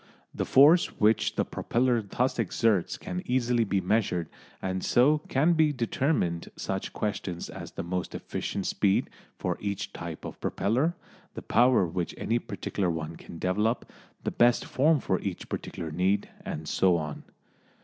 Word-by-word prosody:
The - - -2
force 155 +6 +6
which 110 +1 +3
the - - +1
propeller 120 -1 +1
thus 120 +5 -1
exerts 105 -2 +1
can 180 - -5
easily 125 -2 +1
be 100 -2 0
measured, 90 -4 0 0.3
and 95 0 -3
so 145 +5 +4
can 150 +6 +3
be 155 -2 +4
determined 120 - 0
such 95 0 -3
questions 95 -4 -3
as - - -8
the - - -4
most 90 +1 -3
efficient 100 - -4
speed 100 -1 +1 0.3
for - - -2
each 100 -1 -3
type - - -7
of - - -8
propeller, 135 - +1 0.4
the - - -6
power 125 -5 +4
which 85 0 -3
any 115 +2 0
particular 100 -5 -3
one 80 -1 -3
can 85 - -11
develop, 105 +7 0 0.3
the - - -1
best 120 0 +3
form 150 +3 +3
for 95 - 0
each 95 -3 -5
particular 80 - -5
need, 95 +5 +1 0.2
and 75 0 -5
so 90 -2 +3
on. 75 -2 -5
105 Hz, 155 wpm, -28 LUFS, 90-125 Hz, 0.4 s, force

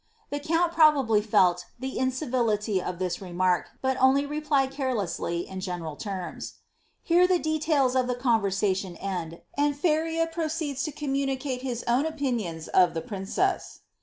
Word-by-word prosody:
The 290 - -2
count 330 +3 +1
probably 285 -10 +5
felt 180 -4 +3
the 260 +1 -4
incivility 240 -7 0
of 180 0 -4
this 180 0 -2
remark, 180 -1 0
but 265 0 +1
only 270 +2 +5
replied 290 -2 0
carelessly, 215 -10 -2
in 190 - -6
general 175 -5 -4
tenns.' 190 0 -6 0.5
Here 350 +2 +4
the 365 -1 +3
details 305 -5 +1
of 255 -1 +2
the 250 - 0
conversation 200 -6 0
end, 175 -3 -5
and 290 0 +1
Feria 325 +1 +1
proceeds 315 -4 -3
to 305 - -3
oommunicate 270 -2 -2
his 245 -3 -3
own 250 +6 +2
opinion 245 - -2
of 180 -2 +5
the 165 - -1
princess.' 200 - -2
255 Hz, 145 wpm, -27 LUFS, 190-295 Hz, 0.5 s, probably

